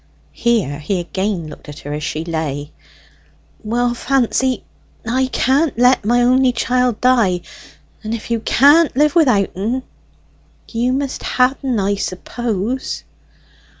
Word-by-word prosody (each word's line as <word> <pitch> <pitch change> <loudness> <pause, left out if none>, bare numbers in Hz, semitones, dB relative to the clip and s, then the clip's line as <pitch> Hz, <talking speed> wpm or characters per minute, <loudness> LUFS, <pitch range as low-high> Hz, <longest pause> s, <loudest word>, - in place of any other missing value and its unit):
Here 215 - 0
he 180 +5 -2
again 190 -1 -3
looked 150 - -12
at 145 - -9
her 145 - -6
as 150 - -4
she 155 +1 -3
lay. 155 -3 -3 0.9
"Well, 240 +2 0
Fancy, 260 0 0 0.4
I 260 +3 +1
can't 270 +2 +1
let 250 0 +4
my 240 +2 +3
only 255 +1 +3
chiel 250 +1 +1
die; 220 -7 +2 0.6
and 215 - -4
if 230 +1 -8
you 230 - +1
can't 290 +8 +4
live 300 +1 +3
without 250 - +3
en, 230 +7 -2 0.8
you 240 +2 -1
must 275 0 -2
ha' 255 +1 +2
en, 255 -5 0
I 200 +1 +1
suppose." 220 +5 -3
235 Hz, 135 wpm, -18 LUFS, 190-255 Hz, 0.9 s, let